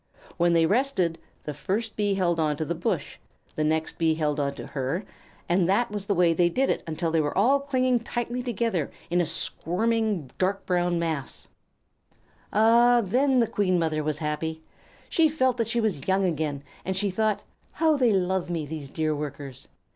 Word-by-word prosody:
When 175 -1 +3
they 165 -1 +4
rested, 195 -6 +1 0.2
the 150 - -4
first 205 - -3
Bee 205 -2 +1
held 175 -3 +1
on 150 -2 +1
to 155 - -2
the 170 - -1
bush, 170 - -3 0.4
the 155 - 0
next 160 +2 -1
Bee 160 -1 +3
held 150 -2 -1
on 140 -1 -1
to - - -7
her, 140 +8 -3 0.4
and 175 +1 +2
that 205 +3 +2
was 205 -1 -5
the 200 - +1
way 175 -1 +4
they 175 +1 +3
did 265 +10 0
until 165 +1 -2
they 165 -1 +3
were 145 -1 -2
all 255 +8 +4
clinging 255 -3 +1
tightly 240 +1 -3
together 230 - -1 0.2
in 175 0 +3
a 170 - 0
squirming, 190 - -1
dark 195 +2 0
brown 175 -1 +1
mass. 160 -5 -3 1.0
Ah, 235 +3 +5
then 260 +7 +2
the 230 - +2
Queen 185 -4 +1
Mother 155 -2 0
was 150 -1 -1
happy! 160 +1 -3 0.4
She 320 -2 +3
felt 260 -5 +1
that 230 - 0
she 235 +1 0
was 195 -12 -1
young 190 0 +2
again, 150 -5 -2 0.2
and 190 0 -2
she 200 0 0
thought, 215 +2 0 0.3
"How 320 -2 +3
they 250 -5 +3
love 190 -2 0
me, 165 -3 -2
these 145 -2 -6
dear 155 +1 -1
Workers!" 140 -2 -7
180 Hz, 185 wpm, -26 LUFS, 160-225 Hz, 1.0 s, Ah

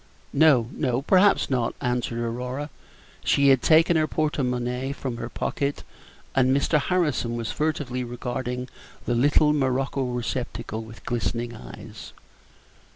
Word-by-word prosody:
"No, 140 -6 +5
no, 130 -2 -1
perhaps 190 +5 +4
not," 125 -3 0
answered 125 -2 -1
Aurora. 125 +5 -3 0.5
She 140 0 +4
had 135 -2 +5
taken 165 +2 +5
her 155 0 +2
porte 155 -1 -1
monnaie 125 +1 -1
from 130 -4 -5
her 120 0 -5
pocket, 140 +2 -2 0.5
and 130 -1 +3
Mr. 150 +2 +2
Harrison 145 -7 0
was 115 -1 -3
furtively 145 -5 -2
regarding 125 +1 -4 0.4
the 120 - 0
little 145 +4 +4
morocco 135 -1 0
receptacle 120 -2 -3
with 110 0 -12
glistening 120 0 -2
eyes. - - -10
125 Hz, 130 wpm, -25 LUFS, 120-145 Hz, 0.5 s, No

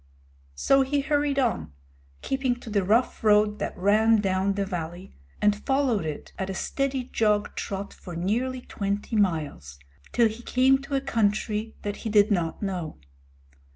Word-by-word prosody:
So 270 - +4
he 280 +2 +1
hurried 290 -1 0
on, 225 - 0 0.5
keeping 265 -2 0
to 225 - -8
the 200 -2 +2
rough 225 +7 +1
road 210 0 +4
that - - -4
ran 215 +4 +4
down 195 0 +1
the 200 0 -1
valley, 175 0 -6 0.3
and 210 0 +2
followed 265 - +1
it 150 - -6
at 190 0 -2
a 190 - -3
steady 275 +4 -1
jog 210 -2 +1
trot 200 0 -4
for 175 -3 -10
nearly 240 +9 -1
twenty 200 0 -3
miles, 155 - -1 0.3
till 235 -1 +4
he 220 +2 -6
came 260 +2 +3
to 275 0 -4
a 270 - +1
country 215 -3 0
that 205 0 -3
he 225 - -5
did 210 0 +4
not 175 -1 -1
know. 180 -6 -3
210 Hz, 160 wpm, -26 LUFS, 190-250 Hz, 0.5 s, So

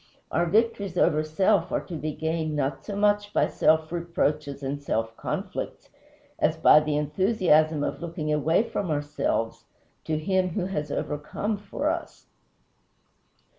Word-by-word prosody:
Our 175 - +1
victories 200 -2 +1
over 155 -3 +3
self 185 +3 +2
are - - +1
to 175 - -6
be 155 0 -3
gained 160 -1 -2
not 135 -1 -1
so 205 - -5
much 205 0 +2
by - - +3
self 160 0 +2
reproaches 155 -4 -1
and 140 +1 -3
self 115 -4 -2
conflicts - - -5 0.5
as - - +2
by 150 - +7
the 150 -1 -1
enthusiasm 155 -1 +2
of - - -3
looking 160 -3 -3
away 155 - +2
from 190 - -3
ourselves 145 -6 -1 0.4
to 155 - 0
Him 185 +3 +1
who 180 +2 -2
has 150 -6 -3
overcome 150 +8 -2
for 205 - -4
us. - - -6
160 Hz, 145 wpm, -26 LUFS, 150-185 Hz, 0.5 s, by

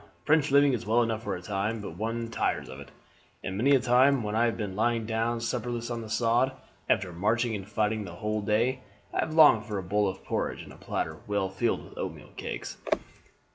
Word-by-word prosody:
French 155 -1 +4
living 140 0 +5
is 115 -2 -2
well 115 +2 +3
enough 115 -1 -2
for 115 - -3
a 90 - -8
time, 105 +4 -1
but 100 -6 -7
one 115 +3 -3
tires - - -1
of 65 - -8
it; 70 - -10 0.5
and 95 - -3
many 135 +7 +4
a - - +4
time 125 +1 +4
when 105 0 -3
I 115 +1 +4
have 115 - 0
been 100 -4 -4
lying 115 +1 +1
down 115 +1 0
supperless 120 0 -3
on 115 -1 -3
the 110 - -8
sod, 120 +4 +2 0.4
after 90 -2 +1
marching 110 +6 +1
and 100 -2 -5
fighting 105 0 0
the 90 -3 -8
whole 105 +3 -2
day, 115 +5 +1 0.3
I - - -1
have 155 - -1
longed 140 -9 +7
for 105 -3 -3
a 95 - -3
bowl 105 +3 +1
of 95 0 -5
porridge - - -2
and - - -12
a - - -13
platter - - -3
well 100 -2 0
filled 95 +5 -1
with - - -12
oatmeal - - -6
cakes." - - -5
115 Hz, 220 wpm, -28 LUFS, 105-120 Hz, 0.5 s, longed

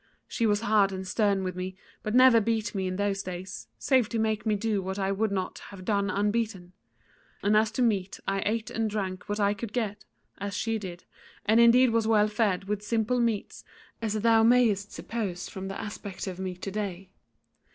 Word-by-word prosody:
She 230 - 0
was 205 0 +2
hard 210 -3 +3
and 190 0 -5
stern 200 -1 +1
with 185 -1 -3
me, 185 +1 -5 0.2
but 215 +2 -2
never 255 -3 +7
beat 220 -1 -1
me 190 -2 -1
in 185 - -2
those 200 0 0
days, 185 +1 -7
save 255 -5 +2
to 230 - -2
make 220 -1 0
me 215 - +3
do 210 -1 0
what 190 +1 -4
I 195 -1 0
would 210 +2 0
not 190 -2 -3
have 190 -2 -10
done 200 -1 +1
unbeaten; 205 -2 -1 0.7
and 205 +1 +3
as 215 +1 +4
to 250 - +1
meat 200 -5 0
I 195 0 0
ate 220 +1 -1
and 225 -1 -1
drank 195 -2 -4
what 205 +1 -1
I 200 0 +3
could 210 +1 -7
get, 215 -4 -2 0.4
as 200 0 -3
she 225 -1 -1
did, 180 -3 -8 0.4
and 220 +2 +4
indeed 235 +1 +6
was 225 -1 +1
well 215 -2 +4
fed 210 -4 +1
with 205 +1 -2
simple 225 +3 0
meats 230 -4 -1 0.4
as 220 -2 -1
thou 225 +1 +4
mayest 225 -4 +3
suppose 200 -7 -4
from 190 0 -6
the 195 - -5
aspect 205 -2 -6
of 185 -2 -6
me 185 -1 -3
to 190 +2 -6
day. 190 -2 -4
205 Hz, 205 wpm, -28 LUFS, 195-225 Hz, 0.7 s, never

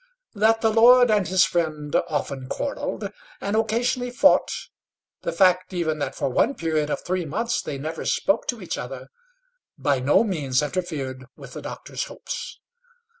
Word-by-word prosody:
That 225 +1 +3
the 225 - +3
lord 245 +2 +7
and 205 -4 +2
his 185 +1 +4
friend 155 -4 -2
often 140 -3 -3
quarrelled, 285 - -3 0.3
and 200 +2 -2
occasionally 240 +3 0
fought, 245 - +4 0.7
the - - -2
fact 185 -1 +3
even 160 -3 -1
that 140 -2 -3
for - - -1
one 205 - +2
period 155 -3 -1
of - - -2
three 185 0 -1
months 230 +10 -1
they 145 - -5
never 155 +4 -5
spoke 195 +4 +1
to 235 -5 -3
each - - -4
other 130 +1 -7 0.7
by 140 -3 +1
no 140 - +4
means 150 - 0
interfered 140 -6 -4
with - - -12
the - - -7
doctor's - - -5
hopes. - - -7
175 Hz, 160 wpm, -24 LUFS, 145-220 Hz, 0.7 s, lord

